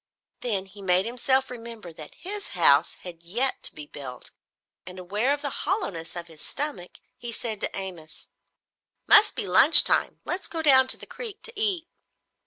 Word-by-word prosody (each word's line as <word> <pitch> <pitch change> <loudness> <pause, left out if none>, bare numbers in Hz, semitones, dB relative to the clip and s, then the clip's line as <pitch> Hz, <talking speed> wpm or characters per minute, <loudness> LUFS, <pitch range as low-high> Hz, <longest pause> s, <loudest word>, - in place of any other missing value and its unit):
Then 205 -6 -3
he 200 +1 -16
made 185 0 +1
himself 260 +3 -1
remember 230 -7 -11
that 155 -1 -13
his 405 +2 -7
house - - +4
had 175 -2 -11
yet 235 +11 -3
to - - -2
be 150 - -9
built, 135 -4 -10 0.5
and 180 +1 -12
aware 205 +8 -2
of 290 +1 -3
the 285 - -3
hollowness 190 - -4
of 170 -1 -7
his 160 -2 -15
stomach, 280 -12 -5 0.2
he 240 - -7
said 225 -2 -6
to - - -4
Amos: 180 -5 -10 0.8
"Must 430 0 +4
be - - -3
lunch - - +9
time. - - +1
Let's 370 +2 -1
go 325 -1 -5
down 265 -3 +6
to - - +6
the - - -12
creek 455 -5 -7
to 460 - -8
eat." 395 -6 -2
230 Hz, 180 wpm, -24 LUFS, 180-290 Hz, 0.8 s, lunch